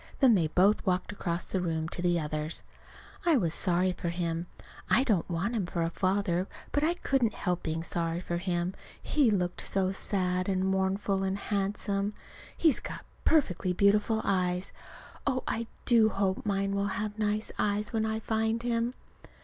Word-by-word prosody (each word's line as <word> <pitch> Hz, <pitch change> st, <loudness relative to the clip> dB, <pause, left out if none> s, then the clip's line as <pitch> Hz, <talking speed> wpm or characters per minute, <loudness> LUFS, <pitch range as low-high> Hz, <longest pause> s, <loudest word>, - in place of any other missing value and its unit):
Then 260 Hz, -4 st, +6 dB
they 170 Hz, -6 st, +3 dB
both 190 Hz, +6 st, +3 dB
walked 185 Hz, 0 st, 0 dB
across 170 Hz, -4 st, -2 dB
the 190 Hz, -, -2 dB
room 160 Hz, -2 st, -1 dB
to 175 Hz, -, -4 dB
the 175 Hz, -1 st, +2 dB
others. 155 Hz, +1 st, -3 dB, 0.6 s
I 335 Hz, -4 st, +4 dB
was 170 Hz, -8 st, 0 dB
sorry 180 Hz, +1 st, +1 dB
for 175 Hz, -1 st, -3 dB
him. 170 Hz, 0 st, -2 dB, 0.4 s
I 260 Hz, -, +5 dB
do 250 Hz, -5 st, +3 dB
not 165 Hz, -, -6 dB
want 180 Hz, +8 st, -1 dB
him 200 Hz, -6 st, -1 dB
for 170 Hz, -1 st, -1 dB
a 165 Hz, -, -1 dB
father, 185 Hz, -1 st, 0 dB, 0.2 s
but 290 Hz, -, +1 dB
I 335 Hz, +3 st, +2 dB
couldn't 260 Hz, -9 st, +1 dB
help 180 Hz, -2 st, -1 dB
being 160 Hz, 0 st, -2 dB
sorry 170 Hz, 0 st, -1 dB
for 175 Hz, -1 st, -3 dB
him, 175 Hz, 0 st, -1 dB, 0.3 s
he 285 Hz, -6 st, +2 dB
looked 180 Hz, -4 st, 0 dB
so 190 Hz, -1 st, 0 dB
sad 185 Hz, -1 st, 0 dB
and 190 Hz, -1 st, +1 dB
mournful 190 Hz, +1 st, +1 dB
and 190 Hz, 0 st, 0 dB
handsome; 200 Hz, 0 st, -1 dB
and 205 Hz, +1 st, -2 dB, 0.4 s
he's 320 Hz, -6 st, +4 dB
got -, -, -7 dB, 0.2 s
perfectly 185 Hz, -, +2 dB
beautiful 210 Hz, +3 st, +3 dB
eyes. 180 Hz, -1 st, 0 dB, 0.5 s
(Oh, 255 Hz, -2 st, +1 dB
I 230 Hz, 0 st, -2 dB, 0.2 s
do 225 Hz, -3 st, +5 dB
hope 195 Hz, 0 st, -1 dB
mine 195 Hz, 0 st, 0 dB
will 200 Hz, 0 st, +1 dB
have 210 Hz, 0 st, -3 dB
nice 210 Hz, 0 st, 0 dB
eyes, 210 Hz, +1 st, +1 dB
when 220 Hz, -1 st, +1 dB
I 220 Hz, 0 st, -1 dB
find 220 Hz, +1 st, 0 dB
him!) 235 Hz, +1 st, 0 dB
195 Hz, 180 wpm, -29 LUFS, 180-215 Hz, 0.6 s, Then